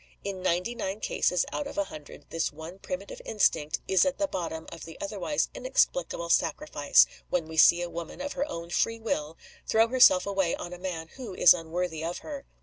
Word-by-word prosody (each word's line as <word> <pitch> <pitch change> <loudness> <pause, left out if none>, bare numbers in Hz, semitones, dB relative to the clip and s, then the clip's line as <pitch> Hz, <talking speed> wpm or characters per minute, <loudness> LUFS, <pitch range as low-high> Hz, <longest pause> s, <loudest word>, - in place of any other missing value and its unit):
In 195 -2 -4
ninety 185 +5 0
nine 195 -3 -4
cases 180 -4 +1
out 290 - -2
of 285 - -9
a 300 - +2
hundred 150 - -11
this 165 -1 -1
one 160 +5 -10
primitive - - -6
instinct 155 - +1
is 190 - +4
at 280 -1 0
the 300 - +1
bottom 165 - -4
of 165 - -9
the 165 - -10
otherwise 205 +8 -1
inexplicable - - 0
sacrifice, 150 -3 +3 0.2
when 170 -3 -1
we 160 - -8
see 175 +2 +6
a - - -3
woman, 170 +4 -7
of 285 +1 -4
her 285 +3 -2
own 170 -4 -6
free 230 +5 +1
will, 160 -8 -3 0.3
throw 225 +1 +3
herself 245 -7 +6
away 195 -3 0
on 175 - -7
a 180 - -9
man 170 -3 -5
who 235 -8 -7
is 175 - +8
unworthy 165 -1 -3
of 170 +2 -3
her. 285 -3 -7
180 Hz, 200 wpm, -28 LUFS, 165-230 Hz, 0.3 s, is